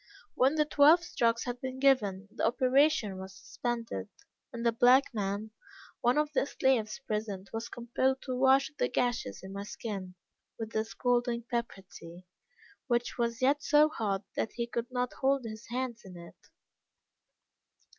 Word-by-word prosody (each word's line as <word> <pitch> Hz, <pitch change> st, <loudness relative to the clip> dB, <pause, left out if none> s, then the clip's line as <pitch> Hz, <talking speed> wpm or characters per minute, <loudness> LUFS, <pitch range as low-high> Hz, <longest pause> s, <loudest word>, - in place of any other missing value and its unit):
When 265 Hz, +4 st, +3 dB
the 305 Hz, -1 st, +3 dB
twelve 300 Hz, +4 st, +5 dB
strokes 230 Hz, -8 st, 0 dB
had 245 Hz, 0 st, -5 dB
been 260 Hz, 0 st, -5 dB
given, 210 Hz, -8 st, +2 dB
the -, -, -5 dB
operation 255 Hz, -4 st, +2 dB
was 190 Hz, 0 st, -9 dB
suspended, 230 Hz, -, -4 dB, 0.4 s
and 235 Hz, 0 st, -5 dB
a 235 Hz, -, +4 dB
black 250 Hz, +4 st, +4 dB
man, 205 Hz, 0 st, -3 dB, 0.5 s
one 245 Hz, +1 st, +2 dB
of 300 Hz, 0 st, +1 dB
the 275 Hz, -, +1 dB
slaves 260 Hz, -4 st, +1 dB
present, 210 Hz, -3 st, -4 dB
was 225 Hz, +1 st, -4 dB
compelled 260 Hz, +2 st, -1 dB
to 255 Hz, -2 st, -3 dB
wash 265 Hz, +3 st, +4 dB
the -, -, +2 dB
gashes 245 Hz, -, -1 dB
in 190 Hz, +1 st, -8 dB
my 200 Hz, -, -5 dB
skin, 200 Hz, -3 st, -6 dB, 0.4 s
with 225 Hz, 0 st, -5 dB
the 220 Hz, 0 st, -1 dB
scalding 240 Hz, 0 st, 0 dB
pepper 235 Hz, -5 st, -4 dB
tea, 175 Hz, -1 st, -12 dB, 0.6 s
which 240 Hz, -1 st, -1 dB
was 235 Hz, +1 st, -1 dB
yet 285 Hz, +3 st, +3 dB
so 300 Hz, +1 st, +5 dB
hot 205 Hz, -8 st, -2 dB
that -, -, -2 dB
he 235 Hz, -, -2 dB
could 235 Hz, 0 st, -4 dB
not 250 Hz, -1 st, -2 dB
hold 270 Hz, -1 st, +2 dB
his 220 Hz, 0 st, -8 dB
hand 245 Hz, -1 st, -3 dB
in 185 Hz, -2 st, -11 dB
it. 170 Hz, 0 st, -14 dB
235 Hz, 160 wpm, -30 LUFS, 215-260 Hz, 0.6 s, twelve